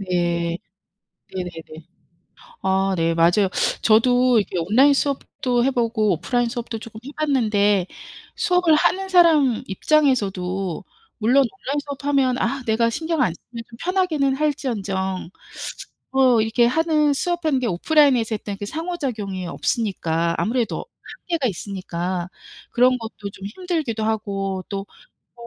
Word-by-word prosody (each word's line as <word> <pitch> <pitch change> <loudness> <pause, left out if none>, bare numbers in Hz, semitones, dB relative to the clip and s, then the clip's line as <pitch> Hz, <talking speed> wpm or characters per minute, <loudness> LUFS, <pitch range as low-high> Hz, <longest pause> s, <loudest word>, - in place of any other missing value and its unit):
네. 175 -2 -1 0.8
네네네. 165 -3 -7 0.8
아 190 0 +1
네 165 -1 +1
맞아요. 175 +4 +3 0.3
저도 245 +2 +4
이렇게 195 - -3
온라인 235 +12 +4
수업도 260 -3 -1
해보고 230 -5 +1
오프라인 245 +8 0
수업도 235 -1 -5
쪼끔 220 -1 -10
해 280 - -7
봤는데 210 -10 +2 0.5
수업을 360 -8 +3
하는 385 +5 +1
사람 320 -9 +4
입장에서도 195 - 0 0.3
물론 235 +4 +2
온라인 270 +9 -3
수업하면 275 -2 0
아 260 +2 -1
내가 230 +1 +2
신경 320 +5 -2
안 165 - +2
쓰면 230 +5 -10
좀 230 - -13
편하기는 330 -7 +1
할지언정 205 - -2 0.8
뭐 260 -3 +4
이렇게 230 +2 +2
하는 305 +1 +2
수업하는 315 -2 0
게 250 - -1
오프라인에서 245 - +3
했던 205 -1 -6
그 205 - -5
상호작용이 250 - -4
없으니까 170 -5 -1
아무래도 235 0 -1 0.4
한계가 335 -6 -1
있으니까 185 -3 -4 0.4
그런 250 +1 +3
것도 220 -3 -7
좀 195 - -9
힘들기도 285 - -3
하고 195 -3 -2
또 200 -1 -4 0.6
뭐 - - -9
230 Hz, 300 characters per minute, -22 LUFS, 195-275 Hz, 0.8 s, 저도